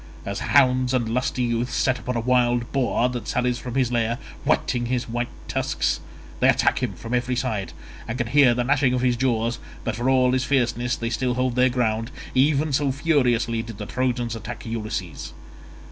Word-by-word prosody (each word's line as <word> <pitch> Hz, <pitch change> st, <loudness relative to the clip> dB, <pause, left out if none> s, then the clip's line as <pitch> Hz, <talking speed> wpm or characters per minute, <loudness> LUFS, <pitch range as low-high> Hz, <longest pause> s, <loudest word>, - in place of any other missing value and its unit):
As 100 Hz, 0 st, -3 dB
hounds 130 Hz, -2 st, +3 dB
and 120 Hz, -3 st, 0 dB
lusty 125 Hz, +2 st, -1 dB
youths 120 Hz, +1 st, -1 dB
set 130 Hz, -1 st, +1 dB
upon 125 Hz, +1 st, -4 dB
a -, -, +1 dB
wild 120 Hz, -1 st, +2 dB
boar 125 Hz, -2 st, +1 dB
that 120 Hz, -3 st, -5 dB
sallies 125 Hz, 0 st, 0 dB
from 125 Hz, -1 st, -6 dB
his 130 Hz, -3 st, +1 dB
lair 115 Hz, -1 st, 0 dB, 0.3 s
whetting 120 Hz, -1 st, +1 dB
his 125 Hz, 0 st, -1 dB
white 120 Hz, +1 st, -2 dB, 0.2 s
tusks—they -, -, -1 dB
attack -, -, +2 dB
him -, -, -1 dB
from 115 Hz, +1 st, -7 dB
every 125 Hz, 0 st, 0 dB
side 115 Hz, -6 st, -2 dB, 0.4 s
and 115 Hz, -, -3 dB
can 120 Hz, -, 0 dB
hear 130 Hz, 0 st, +5 dB
the 125 Hz, -, 0 dB
gnashing 130 Hz, -1 st, +2 dB
of 125 Hz, -, 0 dB
his 125 Hz, -1 st, +2 dB
jaws, 120 Hz, -2 st, 0 dB, 0.2 s
but 115 Hz, -, -2 dB
for 120 Hz, +4 st, 0 dB
all 130 Hz, -1 st, +4 dB
his 130 Hz, 0 st, +1 dB
fierceness 120 Hz, -3 st, +1 dB
they 115 Hz, 0 st, -3 dB
still 125 Hz, +1 st, 0 dB
hold 125 Hz, -1 st, 0 dB
their 130 Hz, +1 st, +4 dB
ground—even 130 Hz, +5 st, 0 dB
so 140 Hz, 0 st, +2 dB
furiously 125 Hz, -6 st, +1 dB
did 115 Hz, -2 st, -9 dB
the 105 Hz, -, -5 dB
Trojans 120 Hz, -1 st, -1 dB
attack 120 Hz, +2 st, -7 dB
Ulysses. 105 Hz, -, -5 dB
125 Hz, 185 wpm, -24 LUFS, 115-130 Hz, 0.4 s, hear